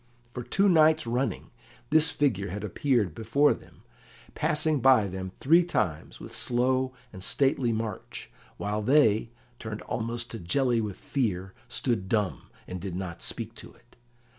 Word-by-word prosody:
For 125 - -4
two 195 - +2
nights 155 -4 +5
running 125 +3 -2 0.4
this 155 0 +5
figure 110 -9 0
had 100 +3 -5
appeared 105 - +1
before 120 - +3
them, - - -15 0.5
passing 155 -1 +1
by 130 -4 +5
them 95 -1 -5
three 165 +6 +5
times 110 - -2
with - - -9
slow 130 +1 +1 0.2
and 95 -1 -7
stately 135 -1 +2
march, 110 -3 -5 0.3
while 105 +1 -2
they, 115 -3 +3 0.3
turned 110 -1 -6
almost 120 +1 -3
to 115 - -6
jelly 120 +6 +1
with 105 -3 -4
fear, 95 -8 -2 0.2
stood 115 -7 -1
dumb, 105 -4 -1 0.2
and 90 -1 -6
did 95 -3 -5
not 90 -2 -5
speak 115 -1 -4
to - - -12
it. 120 - -26
115 Hz, 150 wpm, -28 LUFS, 100-135 Hz, 0.5 s, nights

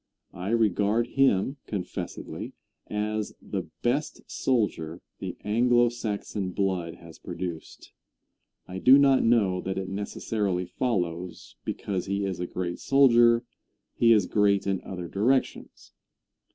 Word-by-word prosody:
I 95 +1 -5
regard 110 0 +2
him, 135 -1 +2
confessedly, 95 -4 -5 0.3
as 105 0 -2
the - - -5 0.2
best 135 +5 -1
soldier 90 -10 -1 0.2
the - - -5
Anglo 120 +3 +3
Saxon 105 -4 -4
blood 95 -4 -1
has 85 -1 -14
produced. 85 -3 -7 0.8
I 95 +1 -6
do 130 +6 +8
not 140 -2 +5
know 100 -6 +3
that 95 0 -3
it 95 -1 -3
necessarily 100 -1 -2
follows 90 -5 -3
because 95 -2 -3
he 100 +1 -1
is 95 -3 -3
a 90 - -2
great 90 -1 -4
soldier 120 -3 +5 0.5
he 115 -1 +4
is 105 -4 +5
great 100 -1 +2
in 95 -2 -1
other 90 -2 -6
directions. 120 +9 -1
100 Hz, 125 wpm, -27 LUFS, 90-120 Hz, 0.8 s, do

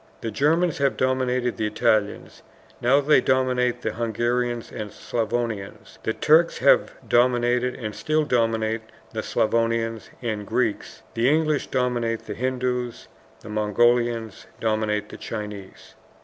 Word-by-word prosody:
The 115 - -3
Germans 165 - +1
have 140 -1 +1
dominated 130 -1 0
the 110 -2 0
Italians, 105 -2 0 0.4
now 135 +4 +4
they 145 -2 +4
dominate 125 -2 +1
the - - -1
Hungarians 120 +1 -1
and 105 -3 -6
Slavonians; 115 -3 -4
the - - -1
Turks 160 +8 +3
have - - +4
dominated 125 0 +2
and 110 -3 -5
still 155 +5 0
dominate 115 -4 0 0.3
the - - -2
Slavonians 115 0 0
and 105 -3 -3
Greeks; 115 -5 -2
the 115 +3 +2
English 155 -1 +1
dominate 120 -3 -1
the - - -5
Hindoos, 125 -1 -2 0.3
the 105 - -11
Mongolians 115 +1 +1
dominate 110 -1 -1
the - - -9
Chinese. 105 -3 -8
120 Hz, 125 wpm, -24 LUFS, 110-125 Hz, 0.4 s, now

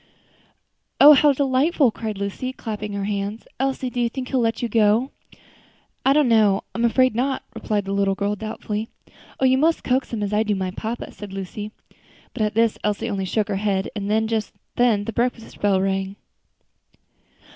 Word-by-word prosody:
"Oh! 295 +2 +10
how 295 +1 +5
delightful!" 275 0 +2
cried 215 -2 -5
Lucy, 200 +6 -3
clapping 210 -4 -5
her 200 0 -3
hands. 200 +2 -3
"Elsie, 265 -1 -1
do 245 - -2
you 235 - +1
think 255 +1 -6
he - - -12
will 255 - +3
let 225 0 0
you - - +1
go?" 225 +3 +2 0.9
"I 270 - +4
don't 290 -1 +4
know, 215 -4 +4
I'm 230 - -2
afraid 255 +2 +3
not," 260 +4 -1
replied 215 -2 -2
the 195 - -4
little 200 -1 +1
girl 200 +1 -1
doubtfully. 215 +1 -5 0.5
"You 260 0 +4
must 325 +3 +2
coax 260 +1 0
him, 220 -3 -2
as 205 0 -2
I 210 - +3
do 210 -2 0
my 190 -1 -2
papa," 225 +4 -5
said 205 -2 -10
Lucy. 195 +2 -6 0.6
But - - -5
at 210 0 0
this 230 -1 +2
Elsie 210 +2 -1
only 195 -1 -2
shook 210 +3 0
her 200 -2 -1
head, 195 -1 -1
and 210 +2 0
just 220 -2 -2 0.2
then 235 -4 +3
the 225 - -5
breakfast 235 -1 -2
bell 200 -2 +3
rang. 195 0 -1
220 Hz, 185 wpm, -22 LUFS, 205-250 Hz, 0.9 s, Oh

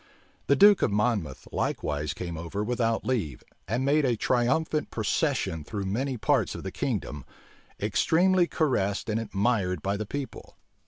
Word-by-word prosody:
The 140 - +5
duke 205 +6 +7
of - - +3
Monmouth 105 - -1
likewise 75 0 -2
came 85 -2 -5
over 85 +6 -4
without 115 0 0
leave, 100 - -2 0.2
and 120 +7 -1
made 145 +2 +3
a 125 -4 +1
triumphant 135 +7 +1
procession 80 -2 -1
through 100 +4 -4
many 125 +7 -1
parts 100 - +1
of - - -7
the - - -4
kingdom, 75 -3 -3 0.6
extremely 180 +1 +3
caressed 115 - 0
and 110 - 0
admired 100 -5 0
by 100 +1 0
the 105 0 -4
people. 140 +3 -6
115 Hz, 150 wpm, -27 LUFS, 95-135 Hz, 0.6 s, duke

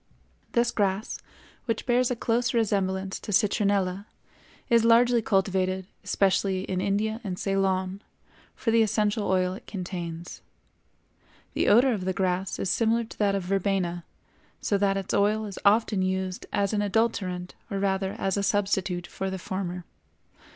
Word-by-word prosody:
This 240 0 +2
grass, 200 0 -1 0.5
which 230 -3 -2
bears 245 0 +2
a 250 - 0
close 235 +1 0
resemblance 195 -3 0
to - - -7
citronella, 200 -1 +1 0.6
is 235 -2 +4
largely 235 +1 +5
cultivated, 190 -2 0 0.2
especially 190 -1 +1
in 185 -1 -2
India 215 +3 0
and 185 -4 -4
Ceylon, 195 0 0 0.5
for 225 - -1
the 230 0 +5
essential 210 0 +1
oil 185 -1 +2
it 190 - -11
contains. 175 -3 -6 1.1
The - - 0
odor 245 +4 +5
of 190 -4 -3
the 190 - 0
grass 185 0 -1
is - - -2
similar 230 +1 +2
to 225 - -12
that 200 -2 +2
of 195 - -2
verbena, 185 -2 -1 0.6
so 205 - 0
that 195 -1 +2
its 195 -1 -4
oil 210 +2 +2
is 200 -2 -7
often 210 -1 +3
used 185 0 -2
as 200 0 0
an 210 - +1
adulterant 200 -4 -1 0.2
or 200 - -3
rather 195 0 0
as 195 0 -1
a - - +1
substitute 195 -3 0
for 195 +2 -4
the 190 - -4
former. 180 -1 -4
195 Hz, 150 wpm, -27 LUFS, 185-215 Hz, 1.1 s, largely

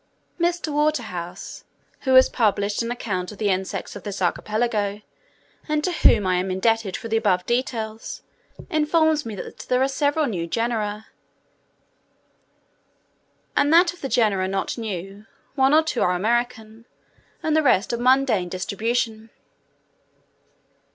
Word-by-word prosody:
Mr. 340 -2 0
Waterhouse, 220 - -2 0.4
who 260 -2 +2
has 260 - +8
published 205 -2 0
an 230 - -3
account 195 -7 -3
of 210 - -11
the 210 -1 0
insects 190 +1 -3
of 205 - -7
this 200 +1 -6
archipelago, 210 +2 -1 0.7
and 300 0 0
to 365 - 0
whom 225 - +4
I 185 -1 +2
am 185 +1 -1
indebted 210 +1 0
for - - -7
the 225 0 +1
above 195 -5 +1
details, 225 -3 -3 0.5
informs 310 -2 +2
me 220 - -5
that - - -8
there 250 - +3
are - - +3
several 285 +3 +1
new 180 -9 -3
genera: 220 0 -2 2.5
and 290 - +3
that 345 +1 +5
of 355 - -18
the 270 - -3
genera 205 -7 +2
not 195 0 -2
new, 200 -2 -6 0.3
one 265 -1 +3
or 315 +1 +5
two 315 -6 -2
are 180 - +3
American, 225 +2 -2 0.6
and 310 -1 +1
the 315 - +4
rest 245 -6 +2
of 235 - -1
mundane 250 -7 +3
distribution. 220 +4 -2
225 Hz, 140 wpm, -23 LUFS, 200-265 Hz, 2.5 s, has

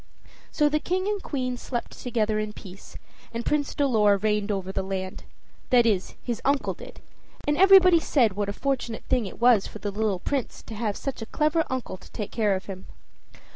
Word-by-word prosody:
So 295 - +3
the 305 +1 +1
King 370 +4 -1
and 415 -1 -1
Queen 255 -6 -3
slept 240 0 -4
together 220 -3 -1
in 215 0 -3
peace, 195 -2 -11 0.3
and 230 0 -4
Prince 295 -1 0
Dolor 220 -8 +3
reigned 210 0 0
over 190 -2 -2
the - - -1
land 190 -1 -5 0.4
that 245 -2 +5
is, 200 -5 0
his 240 -2 -3
uncle 280 0 +1
did; - - -12 0.5
and 295 - +3
everybody 370 -1 +7
said 245 -9 +2
what 205 +1 -2
a - - 0
fortunate 250 -3 -2
thing 245 -5 +1
it - - -10
was 235 -4 +5
for - - -9
the 205 -1 -4
poor 205 +2 -5
little 205 -4 +1
Prince 270 +5 -3
to - - -9
have 210 -2 -2
such 275 -4 -5
a 225 - -5
clever 310 +2 +1
uncle 260 -7 -4
to - - -16
take 210 - -5
care 210 -4 +1
of 190 - -5
him. 190 -2 -8
230 Hz, 205 wpm, -26 LUFS, 205-275 Hz, 0.5 s, everybody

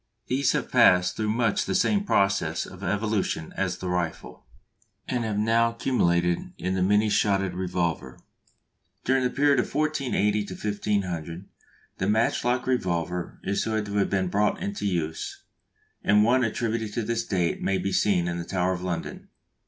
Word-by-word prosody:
These 130 +1 +1
have - - -2
passed 90 0 +5
through 110 -1 -1
much 115 -1 +1
the - - -1
same 200 +2 +2
process 95 - +1
of - - -12
evolution 105 -4 -1
as 95 -2 -1
the 95 - -6
rifle, 85 -7 -4 0.6
and 125 -2 -1
have 110 -2 -2
now 115 +2 +2
culminated 85 -8 0
in 95 +1 -2
the 95 - 0
many 105 +3 +3
shotted 100 -3 +1
revolver. 90 -2 -2 0.9
During 130 0 +2
the 125 - +2
period 140 0 +3
1480 130 -8 0 0.2
1500 95 -5 -2 0.5
the 95 - 0
match 110 +2 +1
lock 125 +1 0
revolver 90 -8 -2
is 100 - -1
said 110 -1 -1
to 100 0 -3
have 100 - +2
been 95 -2 0
brought 105 +3 +1
into 200 - -3
use; 80 -4 -3 0.6
and 105 +1 +4
one 125 +3 +3
attributed 115 -1 -2
to 115 - -1
this 115 +1 -1
date 90 -6 -1
may 95 - +1
be 100 - -2
seen 90 -4 +2
in 85 0 -2
the - - -3
Tower 90 +1 0
of 90 - -5
London. 90 -2 -4
100 Hz, 160 wpm, -26 LUFS, 90-115 Hz, 0.9 s, passed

